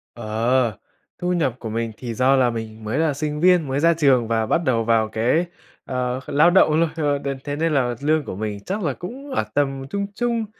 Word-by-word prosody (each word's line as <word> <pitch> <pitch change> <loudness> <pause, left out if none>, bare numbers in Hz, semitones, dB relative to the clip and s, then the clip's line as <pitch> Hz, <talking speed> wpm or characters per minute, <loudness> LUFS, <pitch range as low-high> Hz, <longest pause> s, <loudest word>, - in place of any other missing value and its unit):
Ờ, 115 0 0 0.4
thu 180 0 0
nhập 140 -9 0
của 115 - -6
mình 115 0 -2
thì 120 -2 -5
do 130 +3 +3
là 125 -2 +3
mình 110 -1 -6
mới 110 +6 -2
là 160 -3 +2
sinh 150 +1 -3
viên 180 -4 +4
mới 135 +2 -1
ra 170 +2 +4
trường 135 -7 +3
và 110 -1 +1
bắt 170 +9 +1
đầu 115 -3 +2
vào 110 -1 +2
cái, 120 +11 +1 0.4
ờ, 125 -1 -2
lao 150 +4 +4
động 175 -4 +5
luôn, 165 - +2
ờ, 145 -3 0
đến 140 -1 -4
thế 145 0 -3
nên 160 0 0
là 125 -3 +1
lương 155 +1 +2
của - - -5
mình 105 0 -4
chắc 195 +1 -3
là 140 -4 0
cũng 265 - -8
ở - - +1
tầm 135 -2 0
trung 200 +4 -2
trung, 235 -2 -1
135 Hz, 225 wpm, -22 LUFS, 115-160 Hz, 0.4 s, động